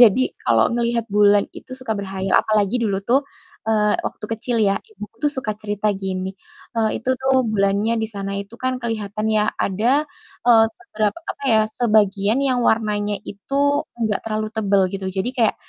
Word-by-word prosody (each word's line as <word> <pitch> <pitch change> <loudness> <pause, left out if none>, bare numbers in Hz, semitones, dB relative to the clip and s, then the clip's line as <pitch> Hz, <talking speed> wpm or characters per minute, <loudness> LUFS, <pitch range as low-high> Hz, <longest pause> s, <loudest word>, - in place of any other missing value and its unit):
jadi 240 +2 +6 0.2
kalau 115 -1 +3
ngelihat 235 -1 0
bulan 205 0 +5
itu 255 - -11
suka 255 -4 -3
berkhayal. 190 -1 -2
Apalagi 215 +1 +2
dulu 200 -4 0
tuh, 255 +4 +4 0.5
eee 210 -1 +3
waktu - - -6
kecil 235 +2 -2
ya, 200 -1 +3
ibuku 225 - -10
tuh - - +2
suka 260 -6 -3
cerita 210 0 -2
gini, 190 0 -4 0.4
eee, 220 -1 +1
itu 255 - 0
tuh 265 0 +2
bulannya 205 +1 +1
di - - 0
sana 200 -2 -5
itu 200 +3 -10
kan 255 0 -1
kelihatan 215 -2 -3
ya, 215 -1 +3 0.2
ada, 240 +10 +1 0.4
eee 230 -2 +7
beberap 215 -1 -2 0.2
apa - - -9
ya, 220 - +5 0.2
sebagian 210 -1 +3
yang 260 -3 +1
warnanya 210 -2 +1
itu 200 +7 -7 0.4
enggak 220 -3 0
terlalu 215 -1 -2
tebel 200 -3 +2
gitu. 195 -1 -4
Jadi 190 +6 0
kayak 230 -3 +3
215 Hz, 170 wpm, -21 LUFS, 200-230 Hz, 0.5 s, eee